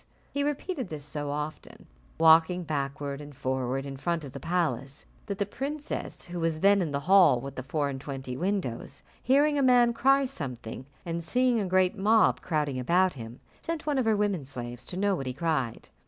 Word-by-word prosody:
He 285 - 0
repeated 290 - -2
this 150 -2 -7
so 145 0 -4
often, 150 +2 -5 0.3
walking 165 +2 +5
backward 140 -2 -3
and 145 -1 -11
forward 130 +1 -2
in 135 -1 -6
front 170 +3 -1
of 140 - -8
the - - -7
palace, 165 -6 -2 0.2
that 200 -2 -3
the 200 - 0
princess, 285 +8 -5
who 175 0 -6
was 165 -1 -1
then 200 0 +5
in 170 - -1
the 140 0 -2
hall 185 -6 +6
with 135 +2 -7
the 130 - -5
four 145 +2 -1
and 135 -1 -5
twenty 135 -3 -5
windows, 160 - -3 0.2
hearing 290 +3 +3
a - - +3
man 245 -2 +5
cry 270 +3 +4
something, 130 - -6 0.2
and 170 0 -3
seeing 250 +6 +2
a 200 - -1
great 185 +1 +3
mob 215 +2 +3
crowding 150 -5 -1
about 180 +8 +3
him, 120 -2 -9 0.2
sent 330 -2 -3
one 290 -3 +1
of 255 - +1
her 220 -2 +3
women 200 -6 0
slaves 120 -2 -7
to 180 - -5
know 200 +1 +2
what 135 -6 -4
he 130 - -2
cried. 140 -5 -2
165 Hz, 200 wpm, -28 LUFS, 140-205 Hz, 0.3 s, hall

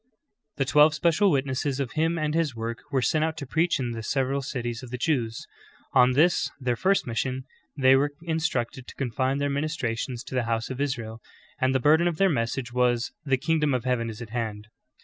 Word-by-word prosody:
"^' - - -52 0.5
The 135 - +1
twelve 150 +3 +5
special 170 +6 +3
witnesses 140 -2 0
of 130 -3 -2
Him 165 +2 0
and 155 -1 -1
His 160 -6 0
work 115 +1 -4
v/ere 130 -2 0
sent 155 +3 +2
out 160 0 -1
to 140 - -5
preach 160 +6 +1
in 125 -2 -2
the 115 -1 -5
several 135 +4 0
cities 120 -3 -4
of 130 - -9
the 125 - -4
Jews. 120 -5 -1 0.5
On 125 0 +5
this, 165 +6 +3
their 125 -2 0
first 195 +10 +2
mission, 130 +3 -2 0.3
they 130 -1 +6
were 145 +2 +1
instructed 135 -7 -2
to - - -11
confine 130 +1 -1
their 145 0 0
ministra 140 -5 -1
tions 120 +1 -4
to - - -10
the 125 -2 0
house 115 +2 -1
of 130 +2 -4
Israel, 115 -5 -3 0.4
and 130 0 +2
the - - +4
burden 155 +6 +4
of 170 -3 -1
their 195 +2 +4
message 120 -3 -2
was 125 -1 +1
"The 135 -2 +2
kingdom 150 -1 +1
of 125 - -2
heaven 120 -2 0
is 110 +1 -7
at 110 - -12
hand.'' 110 -3 -4
130 Hz, 215 wpm, -26 LUFS, 120-150 Hz, 0.5 s, they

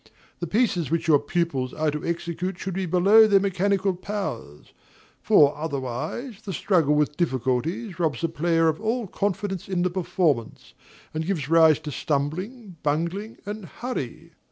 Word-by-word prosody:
The 175 - -3
pieces 180 - +1
which 165 +1 -1
your 150 -3 +6
pupils 145 -4 -2
are 155 -1 +1
to 150 0 -5
execute 170 +2 -3
should 190 +1 -4
be 190 0 -2
below 200 +6 +6
their 200 -2 +5
mechanical 195 0 +1
powers; 180 - -6 0.5
for, 145 -1 +5
otherwise, 150 - -4
the 200 -3 -6
struggle 160 -4 +2
with 150 0 +1
difficulties 165 - -1
robs 155 -8 0
the 165 - +1
player 165 +1 +2
of 160 +4 0
all 225 +2 -1
confidence 195 -1 -3
in 180 -2 0
the 180 - +1
performance, 170 - -1 0.4
and 155 +1 -2
gives 160 -8 -2
rise 160 -2 +6
to 150 - -6
stumbling, 175 - -3
bungling, 170 +9 -2
and 205 -1 -6
hurry. 175 - -6
170 Hz, 155 wpm, -25 LUFS, 150-195 Hz, 0.5 s, your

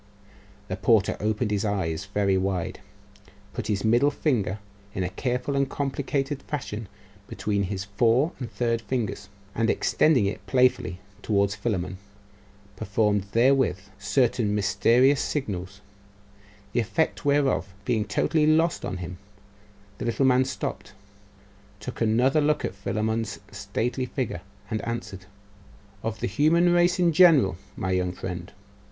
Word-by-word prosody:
The - - -4
porter 110 -4 +3
opened 105 +2 0
his 105 0 0
eyes 95 -4 -1
very 100 -1 +1
wide, 95 -2 -1 0.7
put - - -4
his 100 -2 -1
middle 120 +6 +4
finger 115 - 0 0.4
in 95 - -1
a 90 - -1
careful 125 +6 -2
and 140 0 +1
complicated 140 0 -2
fashion 115 -7 -5 0.4
between 100 -1 -1
his 100 -2 -3
fore 115 - +2
and 120 -4 -5
third 115 -1 0
fingers, 110 -6 -3 0.2
and 115 0 +1
extending 150 -9 +3
it 100 - -3
playfully 125 -8 +2 0.2
towards 100 -2 +1
Philammon, 95 -4 -3 0.8
performed 105 0 0
therewith 125 -5 +3 0.2
certain 110 -1 +1
mysterious 115 +8 +3
signals, 100 -8 -3 0.9
the - - +2
effect 160 +8 0
whereof 140 - +1
being 115 -3 +1
totally 155 +7 +1
lost 160 +2 +3
on 95 - -3
him, 90 0 -7 0.8
the - - -3
little 120 +3 +1
man 130 0 +4
stopped, 130 - -5 0.9
took 120 +4 -7
another 125 +7 +3
look 150 0 +1
at - - -3
Philammon's 110 +2 -2
stately 125 +2 -2
figure, 125 - -3 0.3
and 110 -2 -2
answered 115 -5 -5 0.8
'Of 110 -1 -4
the - - 0
human 165 - +3
race 175 +1 +3
in 175 -2 +3
general, 150 - +6 0.2
my 95 - -2
young 90 -1 0
friend. 90 0 -6
115 Hz, 135 wpm, -26 LUFS, 100-135 Hz, 0.9 s, general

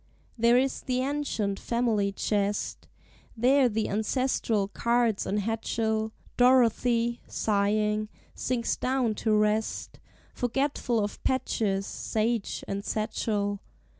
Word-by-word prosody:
There 235 +1 +4
is 265 +1 +1
the 255 0 -1
ancient 260 -8 -1
family 225 -4 0
chest, 205 0 -1 0.5
There 255 +2 +4
the 220 0 -1
ancestral 220 -1 0
cards 235 0 +1
and 205 - 0
hatchel; 220 0 -1 0.3
Dorothy, 240 -1 +3
sighing, 210 +1 0 0.2
sinks 240 -2 -1
down 255 -3 0
to 220 - +1
rest, 215 +1 0 0.3
Forgetful 245 -1 0
of 205 - -5
patches, 205 -6 0
sage, 225 +1 -2
and 200 0 -3
satchel. 210 -2 -1
225 Hz, 105 wpm, -28 LUFS, 210-245 Hz, 0.5 s, There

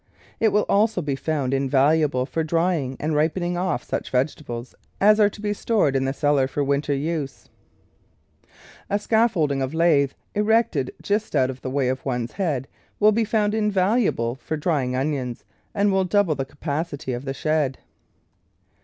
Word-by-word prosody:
It 225 - +4
will 210 - +2
also 210 0 +2
be 140 -2 -1
found 140 -2 -1
invaluable 135 0 +2
for 160 +4 -2
drying 160 -5 0
and 155 +1 -1
ripen 155 +4 +1
THE 175 - -1
VEGETABLE - - -1
GARDEN 180 +1 -1
ing - - +2
off 120 - -7
such - - -4
vegetables 125 -2 -2 0.3
as 210 +2 +5
are 205 -1 +5
to 205 - -12
be 205 -1 -1
stored 205 -10 +1
in 135 0 +1
the 135 - 0
cellar 140 -1 +2
for 145 +1 -2
winter 140 +1 0
use. 145 -1 -4 1.4
A 205 - +2
scaffolding 205 - +1
of 135 +4 -3
lath, 150 -5 +3 0.2
erected 210 - +1
just 205 -3 -1
out 130 -2 +3
of 130 0 -12
the - - -4
way 135 -1 0
of 130 +1 -2
one's 125 -3 -2
head, 150 -10 -2 0.3
will 215 0 +6
be 225 +2 +1
found 210 -1 +1
invaluable 205 - +1
for 150 +4 -5
drying 145 -6 0
onions, 130 -3 -2 0.3
and 200 0 +2
will 190 0 +2
double 195 -3 +2
the 135 -2 -3
capacit}^ 145 -2 -4
of 125 +3 -7
the 135 - -2
shed. 150 -3 0
150 Hz, 180 wpm, -23 LUFS, 135-195 Hz, 1.4 s, will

